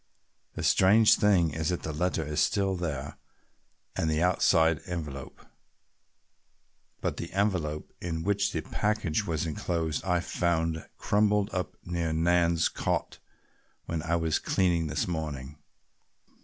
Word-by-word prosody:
The - - -4
strange 105 +4 +5
thing 95 -6 +3
is 80 -1 -2
that 90 - -2
the 80 - -3
letter 80 0 -1
is 75 +1 -2
still 100 +2 +2
there 75 -5 -4 0.8
and 80 - 0
the 80 +2 +1
outside 85 -3 +3
envelope, 75 -7 -6 1.6
but - - -2
the 85 - -6
envelope 90 -7 -1
in 80 -2 -3
which 100 +1 +1
the 80 - -2
package 105 -2 -1
was 80 0 -1
enclosed 80 -1 -2
I 90 -2 +1
found 80 -2 -1
crumpled 105 0 +1
up 90 -4 -3
near 85 -2 -2
Nan's 85 0 +3
cot - - -2 0.7
when 80 -1 -3
I 85 +2 0
was 80 -2 +1
cleaning 85 -3 +1
this - - -1
morning." 75 -4 -5
85 Hz, 130 wpm, -28 LUFS, 80-90 Hz, 1.6 s, strange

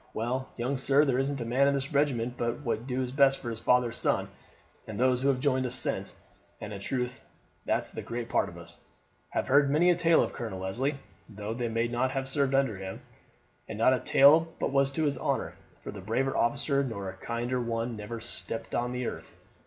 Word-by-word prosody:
Well, 125 +4 -2
young 125 +3 -1
sir, 140 +3 +4
there 130 -2 +1
isn't 135 0 -1
a - - -3
man 130 +4 +3
in 140 - +2
the 135 -1 -2
regiment 130 -5 +1
but 120 +3 -2
wad 120 -2 -2
do 130 0 -1
his 125 -1 -3
best 135 0 +4
for 120 - -5
your 115 - -3
father's 125 +1 +2
son, - - 0 0.5
for 110 - -8
those 125 +3 +2
who 135 - +1
have 135 -2 +2
joined 130 -2 +1
us 125 - +6
since, 130 - +1 0.4
and 105 0 -7
in 100 - -6
truth 125 +4 -3 0.4
that's - - 0
the - - -6
great 120 0 -5
part - - +1
of - - -12
us, - - -8 0.5
have - - -1
heard 140 +1 +4
many 165 +5 +4
a - - +3
tale 165 -1 +4
of - - -4
Colonel 105 -6 -5
Leslie, 130 +10 -1 0.3
though 105 0 -5
they 120 0 -2
may 115 +1 0
not 120 +2 0
have 135 0 -3
served 135 0 +2
under 135 -7 +1
him, 95 0 -7 0.7
and - - -5
not 115 +4 +4
a 130 - +1
tale 155 +4 +6
but - - -1
was 140 0 +3
to 150 +3 -2
his 145 -2 0
honour, - - -1 0.3
for - - -6
a 100 - -9
braver 130 +7 -1
officer 140 +3 +1
nor 105 -7 -4
a 95 - -5
kinder 120 +5 -3
one 115 0 -2
never 110 +2 -6
stepped 115 0 -6
the 125 +1 -2
earth. - - -7
125 Hz, 220 wpm, -29 LUFS, 115-140 Hz, 0.7 s, us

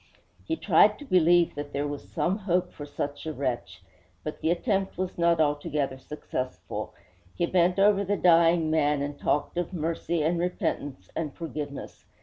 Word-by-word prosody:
He 325 - 0
tried 210 - +4
to 290 - -10
believe 175 - +4
that 145 0 -6
there 145 +1 -1
was 145 0 -7
some 180 - 0
hope 180 -2 0
for 145 - -8
such 145 +1 -5
a 155 - -2
wretch; 120 -10 -3 0.4
but 155 - -6
the 160 - +1
attempt 195 +2 0
was 185 0 -3
not 170 -1 +2
altogether 145 -2 0
successful. 130 -2 -5 0.4
He 175 - +1
bent 180 +1 +2
over 200 0 +4
the 200 +1 0
dying 165 -2 +4
man 150 -2 +2
and 145 0 -5
talked 150 +4 0
of 175 +1 -3
mercy 165 -1 -1
and 170 +2 +1
repentance 145 - -3
and 155 -4 -3
forgiveness. 150 -4 -6
165 Hz, 165 wpm, -27 LUFS, 145-180 Hz, 0.4 s, tried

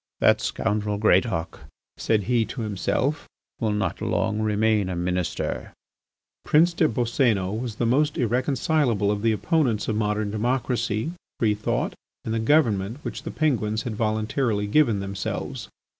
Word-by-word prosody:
"That - - +4
scoundrel 105 -1 -1
Greatauk," 95 -4 +1 0.4
said 110 -2 +1
he 120 +2 +2
to 120 - -6
himself, 115 +8 -1 0.3
"will, 110 - 0
not 105 +1 -2
remain 110 -1 +1
long - - -4
a - - -3
Minister." 90 -1 -2 0.7
Prince 170 +3 +4
des 165 -2 +3
Boscénos 115 -4 0
was 120 -4 -4
the 120 - -1
most 145 +6 +2
irreconcilable 125 - +1
of 105 -1 -2
the 115 0 +3
opponents 125 - +1
of 110 - 0
modern 105 -1 0
democracy, 115 +2 -1 0.3
free 110 -3 +3
thought, 105 +1 -1 0.3
and 110 - -2
the 115 - 0
government 110 -5 +2
which 120 0 -5
the 160 - -6
Penguins 110 -8 0
had 120 -4 -4
voluntarily 110 0 0
given 115 -2 +3
themselves. 100 0 -4
110 Hz, 145 wpm, -24 LUFS, 105-125 Hz, 0.7 s, That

